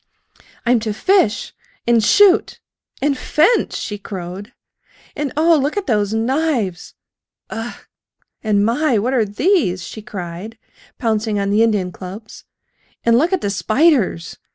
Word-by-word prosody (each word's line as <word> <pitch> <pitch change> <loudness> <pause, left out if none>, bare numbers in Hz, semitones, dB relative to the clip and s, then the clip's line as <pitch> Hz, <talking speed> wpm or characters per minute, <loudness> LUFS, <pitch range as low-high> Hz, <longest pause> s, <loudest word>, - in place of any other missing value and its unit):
"I'm 240 0 +3
to 220 -1 -3
fish 370 - +1 0.3
and 235 -2 +3
shoot 410 - +4 0.4
and 285 -1 +2
fence!" 320 - +1
she 205 -1 -5
crowed. 195 +2 -7 0.6
"And, 290 -3 -3
oh! 330 +2 +5
look 290 +8 -2
at 405 - -1
those 210 -4 +1
knives! 230 - -1 0.6
U - - -5
ugh!... 230 +2 -7 0.6
And, 205 -2 +2
my! 250 +2 +1
what 240 +6 0
are 235 -4 +2
these?" 205 - +1
she 220 - -8
cried, 190 +2 -7 0.4
pouncing 220 -2 -1
on 200 0 -1
the 210 +2 +3
Indian 205 -5 +1
clubs. 195 +5 -10 0.6
"And 230 0 +4
look 315 +9 +2
at 380 -3 0
the 200 - -1
spiders! 220 - +1
225 Hz, 140 wpm, -19 LUFS, 205-285 Hz, 0.6 s, oh